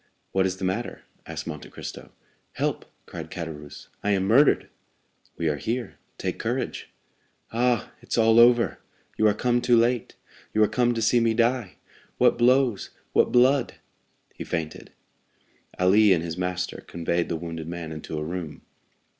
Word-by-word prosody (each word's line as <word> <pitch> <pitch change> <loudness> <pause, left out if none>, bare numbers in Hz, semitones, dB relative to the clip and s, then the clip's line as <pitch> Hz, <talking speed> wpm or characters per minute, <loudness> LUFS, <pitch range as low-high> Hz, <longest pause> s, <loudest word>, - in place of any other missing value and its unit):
"What 95 0 +2
is 95 0 -4
the 95 - -3
matter?" 95 +6 -3 0.2
asked - - -6
Monte - - -7
Cristo. - - -9 0.4
"Help," - - -2 0.2
cried - - -8
Caderousse; 75 -4 -8 0.2
"I 105 - 0
am 95 -1 +1
murdered!" 120 +9 +4 0.7
"We 85 - -1
are 75 -2 0
here;—take 120 - -5
courage." - - -3 0.6
"Ah, 120 -1 +1
it's - - -3
all 115 0 +5
over! 120 0 +5 0.4
You 110 - +3
are 105 - +3
come 120 +2 +1
too 120 -1 +4
late—you 115 -2 -1
are - - +4
come 120 +1 +1
to 115 - -1
see 120 +2 +4
me 115 -1 +2
die. 120 -3 +1 0.4
What 125 -1 +4
blows, 125 -3 +3 0.2
what - - +3
blood!" 130 +2 +3 0.6
He - - -7
fainted. 80 -3 -5 0.9
Ali 100 +2 +5
and 85 -2 0
his 85 -1 -4
master 90 0 -3
conveyed 85 0 -1
the 85 - -1
wounded 80 -1 -6
man 85 -1 -6
into 80 0 -6
a 75 - -2
room. 80 -1 -6
105 Hz, 155 wpm, -25 LUFS, 85-120 Hz, 0.9 s, all